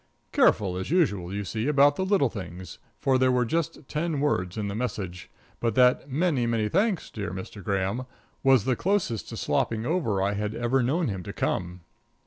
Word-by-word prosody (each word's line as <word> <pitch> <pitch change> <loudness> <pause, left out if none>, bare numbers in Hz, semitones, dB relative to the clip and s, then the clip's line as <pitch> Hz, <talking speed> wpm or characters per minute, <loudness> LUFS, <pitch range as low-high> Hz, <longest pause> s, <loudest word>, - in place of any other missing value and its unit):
Careful 95 -3 +3
as 95 - -4
usual, 105 - +1
you 100 +1 -3
see, 110 +5 -2
about 145 0 +5
the 190 - -1
little 190 - +2
things, 95 -3 -8 0.2
for 130 -1 +2
there 130 0 +4
were 125 -1 +2
just 165 +1 -2
ten 155 -1 -2
words 90 -10 0
in 105 -1 -2
the 100 - -3
message. 100 -6 -4 0.3
But 115 -1 0
that 125 +2 +4
"Many, 140 -4 +1
many 110 -2 0
thanks, 195 - 0
dear 100 -2 -4
Mr. 95 +2 -7
Graham," 100 +6 -1 0.3
was 130 -6 +4
the 130 - +2
closest 180 - -1
to - - -6
slopping 115 0 0
over 145 - 0
I 100 +2 +1
had 105 +1 -3
ever 120 +3 +1
known 150 +8 +1
him 95 -4 -3
to - - -7
come. 90 0 -2
120 Hz, 190 wpm, -26 LUFS, 100-145 Hz, 0.3 s, about